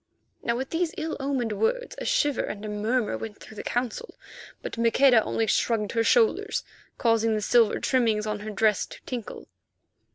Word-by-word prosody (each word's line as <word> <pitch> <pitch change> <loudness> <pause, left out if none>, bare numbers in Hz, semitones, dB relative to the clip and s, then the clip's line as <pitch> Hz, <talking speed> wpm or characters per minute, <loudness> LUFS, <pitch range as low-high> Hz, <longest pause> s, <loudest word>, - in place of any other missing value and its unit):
Now 235 0 -1
at 265 - -5
these 340 +2 -1
ill 320 -1 -3
omened 270 -5 -1
words 355 - -1
a - - -5
shiver 295 - +2
and 210 +1 -5
a - - -4
murmur 215 +2 0
went 220 -2 -7
through - - -12
the - - -5
Council. 245 - -3 0.5
But - - -5
Maqueda 235 +1 +5
only 225 - 0
shrugged 215 0 +1
her 230 -1 +1
shoulders, 455 - +2 0.3
causing 225 -2 +2
the - - 0
silver 225 0 +3
trimmings 225 -5 +1
on 210 -1 -2
her 215 +1 -6
dress 210 0 +1
to - - -11
tinkle. 245 -4 -6
230 Hz, 175 wpm, -26 LUFS, 215-270 Hz, 0.5 s, Maqueda